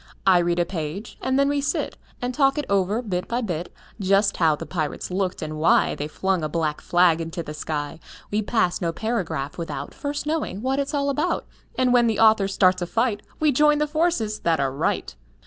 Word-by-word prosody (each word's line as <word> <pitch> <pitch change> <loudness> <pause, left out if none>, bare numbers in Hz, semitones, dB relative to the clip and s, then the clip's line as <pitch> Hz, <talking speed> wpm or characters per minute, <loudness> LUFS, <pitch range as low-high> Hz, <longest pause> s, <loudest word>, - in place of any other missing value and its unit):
I 185 -2 +6
read 175 0 +1
a 175 - +2
page, 170 +3 -5
and 260 0 +1
then 280 0 +4
we 285 0 +1
sit 285 - -1 0.3
And 250 +1 -1
talk 275 +1 +3
it 295 - -1
over, 200 +4 +1
bit 180 -5 -3
by 240 +1 -1
bit; 175 -6 -4 0.3
Just 195 +1 +2
how 160 -3 +4
the - - -7
pirates 155 0 -3
looked, 185 0 -1
and 155 0 -5
why 160 - +4
They 145 - -4
flung 185 +2 -1
a 155 - -1
black 155 -1 -1
flag 170 -2 +2
to 170 0 -4
the 150 - -7
sky. 150 0 -4 0.3
We 210 +1 +1
pass 210 -5 0
no 170 -2 0
paragraph 165 - -3
without 145 -4 -5
First 290 +1 -4
knowing 300 - -2
what 265 +2 0
it's 280 +1 -2
all 280 0 +1
about, 300 +6 -1 0.3
And 255 -1 +2
when 240 -1 +5
the 220 -2 0
author 215 -3 +5
starts 185 -2 +3
a 175 - -2
fight 225 +2 0 0.2
We 310 -1 +3
join 300 +2 +4
the 300 - +2
forces 300 -9 0
that 165 -1 +1
are 135 -1 +1
right. 135 - -1
195 Hz, 215 wpm, -24 LUFS, 165-255 Hz, 0.3 s, I